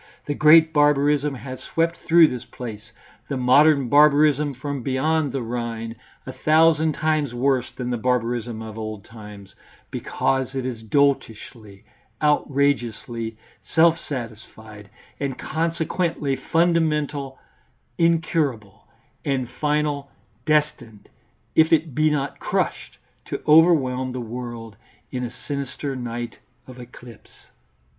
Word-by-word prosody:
The 145 Hz, -, -2 dB
great 160 Hz, +2 st, +6 dB
barbarism 145 Hz, -1 st, +2 dB
has 130 Hz, 0 st, -8 dB
swept 165 Hz, +3 st, -1 dB
through 170 Hz, 0 st, +7 dB
this 125 Hz, -5 st, -3 dB
place, 110 Hz, -2 st, -9 dB, 0.4 s
the 140 Hz, -, -2 dB
modern 140 Hz, +2 st, +4 dB
barbarism 145 Hz, 0 st, +4 dB
from 140 Hz, +1 st, -5 dB
beyond 145 Hz, +3 st, 0 dB
the 135 Hz, -1 st, -3 dB
Rhine, 115 Hz, -1 st, -4 dB, 0.3 s
a 130 Hz, -, -7 dB
thousand 155 Hz, +3 st, +3 dB
times 150 Hz, -4 st, -1 dB
worse 130 Hz, 0 st, +1 dB
than 125 Hz, -1 st, -5 dB
the 120 Hz, -, -2 dB
barbarism 120 Hz, -2 st, -1 dB
of 110 Hz, 0 st, -8 dB
old 110 Hz, -2 st, -6 dB
times, 105 Hz, -3 st, -12 dB, 0.4 s
because 130 Hz, 0 st, -1 dB
it 130 Hz, -1 st, -2 dB
is 120 Hz, -3 st, -5 dB
doltishly, 110 Hz, -5 st, -1 dB, 0.4 s
outrageously 120 Hz, -6 st, 0 dB, 0.4 s
self 165 Hz, 0 st, +5 dB
satisfied, 110 Hz, -4 st, -8 dB, 0.3 s
and 140 Hz, -2 st, -3 dB
consequently 165 Hz, -2 st, -2 dB
fundamental, 150 Hz, -5 st, 0 dB, 0.6 s
incurable, 155 Hz, -, 0 dB, 0.4 s
and 130 Hz, -4 st, -2 dB
final 150 Hz, -2 st, -1 dB, 0.4 s
destined, 150 Hz, -8 st, -1 dB, 0.4 s
if 160 Hz, 0 st, +4 dB
it 160 Hz, -3 st, +2 dB
be 155 Hz, +4 st, +2 dB
not 145 Hz, -2 st, -2 dB
crushed, -, -, -2 dB, 0.3 s
to -, -, -5 dB
overwhelm 140 Hz, -6 st, +4 dB
the 130 Hz, -, -4 dB
world 115 Hz, -2 st, -7 dB, 0.3 s
in 125 Hz, -1 st, -3 dB
a 120 Hz, -, -3 dB, 0.2 s
sinister 140 Hz, -1 st, -4 dB
night 120 Hz, -1 st, -6 dB, 0.3 s
of 130 Hz, -1 st, -12 dB
eclipse. 120 Hz, -2 st, -13 dB
135 Hz, 115 wpm, -23 LUFS, 120-150 Hz, 0.6 s, through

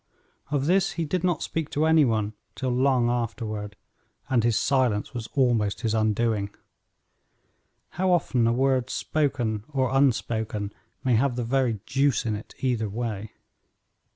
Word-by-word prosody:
Of 140 Hz, -1 st, 0 dB
this 190 Hz, +3 st, +2 dB
he 165 Hz, -, -2 dB
did 180 Hz, +3 st, -1 dB
not 175 Hz, -3 st, +1 dB
speak 160 Hz, -2 st, -3 dB
to 150 Hz, +2 st, +1 dB
any 160 Hz, -2 st, +5 dB
one 110 Hz, -3 st, 0 dB, 0.2 s
till 130 Hz, -2 st, -2 dB
long 125 Hz, -1 st, +3 dB
afterward, 110 Hz, -3 st, -3 dB, 0.6 s
and 120 Hz, -3 st, +3 dB
his 115 Hz, -2 st, +2 dB
silence 125 Hz, -7 st, +1 dB
was 120 Hz, -2 st, -5 dB
almost 115 Hz, -6 st, +2 dB
his 110 Hz, -3 st, 0 dB
undoing. 110 Hz, -1 st, +1 dB, 1.4 s
How 185 Hz, +1 st, 0 dB
often 130 Hz, -9 st, +2 dB
a -, -, +3 dB
word 130 Hz, 0 st, +1 dB
spoken 125 Hz, -10 st, -1 dB
or 130 Hz, -3 st, 0 dB
unspoken 110 Hz, -6 st, 0 dB, 0.3 s
may 130 Hz, -3 st, +2 dB
have 130 Hz, +1 st, +1 dB
the 120 Hz, -, -2 dB
very 120 Hz, -3 st, 0 dB
deuce 135 Hz, 0 st, +1 dB
in 110 Hz, -2 st, 0 dB
it 105 Hz, -, -9 dB
either 120 Hz, -5 st, 0 dB
way! 110 Hz, -1 st, -4 dB
120 Hz, 150 wpm, -26 LUFS, 110-140 Hz, 1.4 s, any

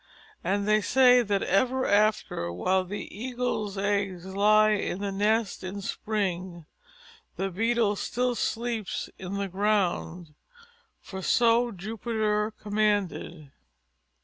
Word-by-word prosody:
And 200 Hz, +1 st, 0 dB
they 215 Hz, 0 st, +4 dB
say 250 Hz, +1 st, +5 dB
that 200 Hz, -4 st, 0 dB
ever 260 Hz, +5 st, +1 dB
after, 205 Hz, -, +1 dB
while 185 Hz, -, +1 dB
the 205 Hz, +3 st, -6 dB
Eagle's 240 Hz, -3 st, -3 dB
eggs 195 Hz, -3 st, -1 dB
lie 210 Hz, +3 st, +4 dB
in 205 Hz, -3 st, -1 dB
the 200 Hz, 0 st, -3 dB
nest 210 Hz, +1 st, 0 dB
in 190 Hz, +2 st, -5 dB
spring, 185 Hz, -5 st, -3 dB, 0.7 s
the 195 Hz, 0 st, -2 dB
Beetle 225 Hz, +2 st, +1 dB
still 250 Hz, +4 st, -1 dB
sleeps 230 Hz, -3 st, -3 dB
in 190 Hz, +1 st, -5 dB
the 200 Hz, 0 st, -2 dB
ground. 185 Hz, -4 st, -1 dB, 0.7 s
For 190 Hz, -1 st, -8 dB
so 235 Hz, +4 st, +3 dB
Jupiter 215 Hz, +1 st, -2 dB
commanded. 205 Hz, -7 st, -1 dB
205 Hz, 115 wpm, -27 LUFS, 190-220 Hz, 0.7 s, say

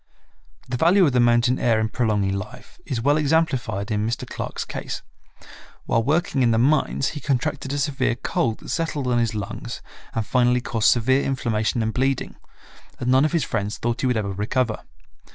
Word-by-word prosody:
The 125 Hz, 0 st, -2 dB
value 180 Hz, +7 st, +5 dB
of 145 Hz, -, +2 dB
the 125 Hz, -, +2 dB
mountain 120 Hz, +1 st, +3 dB
air 115 Hz, -2 st, +2 dB
in 110 Hz, -, +1 dB
prolonging 105 Hz, -4 st, 0 dB
life 110 Hz, +6 st, -8 dB
is 130 Hz, -6 st, -2 dB
well 145 Hz, +3 st, +4 dB
examplified 135 Hz, -, 0 dB
in 105 Hz, 0 st, 0 dB
Mr. 115 Hz, -, -3 dB
Clark's -, -, -5 dB
case. -, -, -6 dB, 0.8 s
While 115 Hz, -, +2 dB
working 145 Hz, +2 st, +1 dB
in 120 Hz, -, +4 dB
the 115 Hz, -, +2 dB
mines 140 Hz, +2 st, +2 dB
he 150 Hz, -, -6 dB
contracted 140 Hz, +1 st, -1 dB
a 145 Hz, -, -1 dB
severe 140 Hz, -4 st, 0 dB
cold 115 Hz, -2 st, -1 dB
that -, -, -10 dB
settled 155 Hz, -4 st, -2 dB
on 125 Hz, -1 st, +2 dB
his 115 Hz, -2 st, 0 dB
lungs 110 Hz, +3 st, -5 dB, 0.4 s
and 110 Hz, -1 st, -1 dB
finally 125 Hz, 0 st, +3 dB
caused 115 Hz, -3 st, +1 dB
severe 130 Hz, +3 st, +3 dB
inflammation 115 Hz, -4 st, -1 dB
and 110 Hz, 0 st, -1 dB
bleeding, 135 Hz, +1 st, -1 dB, 0.6 s
and 125 Hz, 0 st, 0 dB
none 130 Hz, +3 st, +5 dB
of 155 Hz, -, 0 dB
his 170 Hz, -4 st, +1 dB
friends 105 Hz, -4 st, -2 dB
thought 120 Hz, 0 st, -2 dB
he 130 Hz, -, +1 dB
would 125 Hz, -2 st, +1 dB
ever 100 Hz, -2 st, -2 dB
recover. 110 Hz, +4 st, -1 dB
125 Hz, 190 wpm, -23 LUFS, 110-135 Hz, 0.8 s, value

